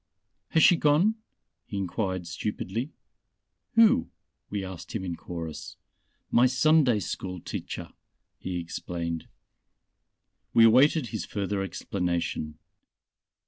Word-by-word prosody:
"Has 160 - +3
she 175 - +7
gone?" 155 +9 +4 0.5
he 100 - -5
enquired 95 -1 -2
stupidly. 105 - -3 0.8
"Who?" 230 -2 +5 0.4
we 100 -2 -3
asked 95 +1 -8
him 95 -4 -2
in 85 -2 -3
chorus. 85 -2 -7 0.5
"My 120 +2 +6
Sunday 130 -2 +4
school 90 0 -4
teacher," - - -6 0.5
he 90 -1 -4
explained. 85 -1 -4 1.3
We 115 - +8
awaited 135 +4 +5
his 110 - -4
further 100 -1 -2
explanation. 90 -4 -2
100 Hz, 100 wpm, -27 LUFS, 90-125 Hz, 1.3 s, We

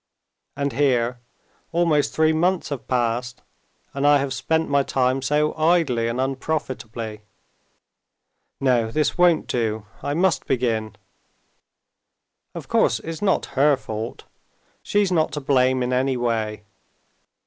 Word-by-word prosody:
And 140 -1 -1
here 125 -4 +1 0.5
almost 165 -3 +2
three 160 0 +2
months 180 +3 +1
have 135 -3 -6
passed, 120 0 -1 0.5
and 140 +1 +1
I 145 0 +6
have 140 -1 -2
spent 160 +4 0
my 140 0 +3
time 130 0 0
so 150 +3 +1
idly 155 -8 +2
and 115 +2 -2
unprofitably. 130 -5 -3 1.4
No, 125 -4 +2
this 150 +5 0
won't 175 -2 +3
do; 110 -3 -2 0.2
I 145 - -2
must 175 -3 +1
begin. 115 -4 -1 1.6
Of - - -7
course, - - +2
it's 165 +2 -6
not 200 -2 +1
her 140 +1 +4
fault. 110 -3 -6 0.6
She's 205 -2 +1
not 160 -3 +2
to 150 - -2
blame 130 -2 +2
in 125 +1 -1
any 130 +1 +1
way. 110 -3 -2
135 Hz, 125 wpm, -23 LUFS, 120-155 Hz, 1.6 s, I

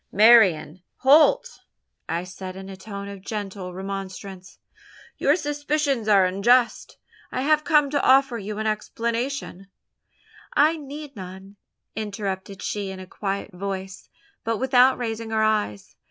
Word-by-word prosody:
"Marian 190 -7 +5
Holt!" 305 - +4 0.5
I 170 - -1
said, 185 0 -8
in 190 0 -9
a 195 - -7
tone 200 +1 -8
of 200 -1 -9
gentle 195 -3 -5
remonstrance, 190 0 -7 0.6
"your - - +4
suspicions 290 - -1
are 200 -3 +5
unjust; 235 +7 +2 0.3
I - - -2
have 305 +1 +3
come 300 -3 +3
to 285 -1 +1
offer 265 -2 +4
you 205 +1 -6
an 220 - -3
explanation 230 0 -3 0.5
" - - -24
"I 325 - -1
need 290 -1 -9
none," 190 +1 -10 0.4
interrupted 200 -2 -5
she 205 -2 -3
in 190 0 -7
a 185 - -8
quiet 200 +2 -4
voice, 190 0 -6 0.3
but 230 -1 -1
without 260 +1 +4
raising 225 -2 -4
her 220 0 +1
eyes. 210 - -1
210 Hz, 140 wpm, -24 LUFS, 190-255 Hz, 0.6 s, Marian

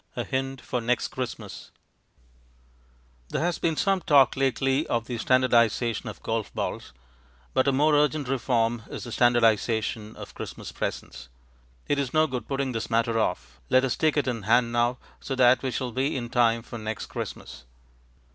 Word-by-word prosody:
A - - -2
Hint 135 0 -3
for 125 - -3
Next 120 +1 0
Christmas 125 -3 -6 1.6
There - - -1
has 175 0 -1
been 165 -1 0
some 195 +3 +1
talk 140 -5 +5
lately 135 +1 +1
of 115 -1 -1
the 120 -1 -5
standardization 120 -2 +2
of 105 - -11
golf 115 -2 -2
balls, - - -4 0.6
but 130 - +2
a - - +5
more 150 +3 +3
urgent 150 -1 +2
reform 120 -3 0
is - - -6
the 120 - -7
standardization 115 -2 +2
of - - -10
Christmas - - -7
presents. - - -5 0.6
It 145 - +1
is 140 0 -2
no 155 0 +5
good 125 -7 -5
putting 135 -1 -1
this 115 -2 -4
matter 115 0 +1
off; 65 - -3
let 130 +1 +4
us 130 - -1
take 155 -1 +1
it 145 - +1
in 120 -3 -2
hand 115 +3 +3
now, 120 +1 +1 0.2
so 135 - -4
that 125 0 +5
we 130 - -2
shall 125 0 -3
be 135 +4 -1
in 120 -2 -4
time 115 -1 +2
for 120 -1 -8
next 110 0 -4
Christmas. - - -7
125 Hz, 175 wpm, -26 LUFS, 115-135 Hz, 1.6 s, talk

